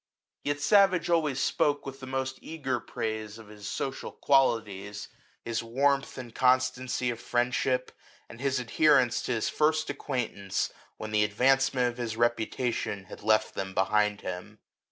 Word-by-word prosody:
Yet 145 0 -1
Savage 185 -1 +4
always 150 -5 +2
spoke 145 +1 +1
with 135 0 -7
the 130 - -8
most 135 0 -3
eager 140 -6 -3
praise 110 -1 -4
of 110 -2 -13
his 105 -1 -9
social 135 +5 -4
qualities, 105 -7 +1 0.4
his 115 0 -1
warmth 135 +4 +1
and 120 -3 -8
constancy 130 -1 +2
of 115 - -7
friendship, 125 +1 0 0.4
and 115 - -12
his 135 -1 +1
adherence 130 0 +3
to 130 - -2
his 115 - 0
first 155 0 +1
acquaintance 115 -9 -3 0.2
when 110 - -6
the 105 -1 +3
advancement 125 +4 +3
of 120 - -9
his 115 -2 -3
reputation 120 -3 -1
had 95 - -11
left 110 +1 +2
them 95 0 -5
behind 105 +1 +2
him. 95 +4 -6
125 Hz, 150 wpm, -28 LUFS, 110-135 Hz, 0.4 s, Savage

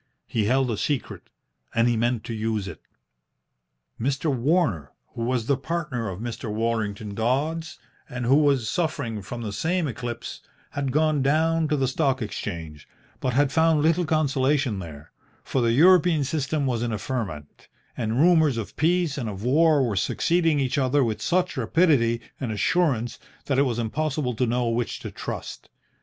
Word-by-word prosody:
He 110 -3 -1
held 130 +2 +2
a 110 - -2
secret, 145 +2 -3 0.5
and 115 +1 +4
he 120 - +2
meant 120 0 0
to 115 - -5
use 110 -2 -2
it. - - -9 1.2
Mr. 135 +4 0
Warner, 125 - +1 0.2
who - - -6
was 120 -1 0
the 140 +1 +2
partner 145 -7 -3
of 90 0 -6
Mr. 115 -1 -5
Worlington 110 -2 -2
Dodds, 145 +9 -1 0.3
and 125 -1 -4
who 125 - +4
was 140 -6 +2
suffering 115 -7 -2
from 120 +5 -7
the 105 -2 -4
same 165 - 0
eclipse, 120 -1 -6 0.3
had 140 -2 -2
gone 155 0 +2
down 160 +3 +2
to 150 0 0
the 135 -1 +1
Stock 135 0 +1
Exchange, 80 -8 -6 0.3
but 130 - -1
had 140 +1 +2
found 160 -1 +3
little 165 +2 +3
consolation 140 -6 +1
there, 75 -5 -10 0.3
for 130 - -1
the 115 -1 +2
European 170 +2 +5
system 145 +1 -1
was 120 -3 0
in 120 -1 -1
a 110 - -1
ferment, 95 - -5 0.3
and 115 0 -1
rumours 160 -5 +4
of 110 - -5
peace 165 -3 +1
and 115 -4 -3
of 100 0 -7
war 145 +1 +4
were 105 - -2
succeeding 165 - +1
each 135 +1 0
other 135 +1 +2
with 110 -3 -2
such 180 +1 +1
rapidity 120 -3 +2 0.2
and 125 -5 -3
assurance 120 - 0 0.3
that 135 -2 +1
it 140 - +4
was 120 - -2
impossible 135 +3 -1
to 125 +2 0
know 120 +1 0
which 115 +1 -1
to - - -7
trust. - - -7
130 Hz, 170 wpm, -25 LUFS, 115-155 Hz, 1.2 s, European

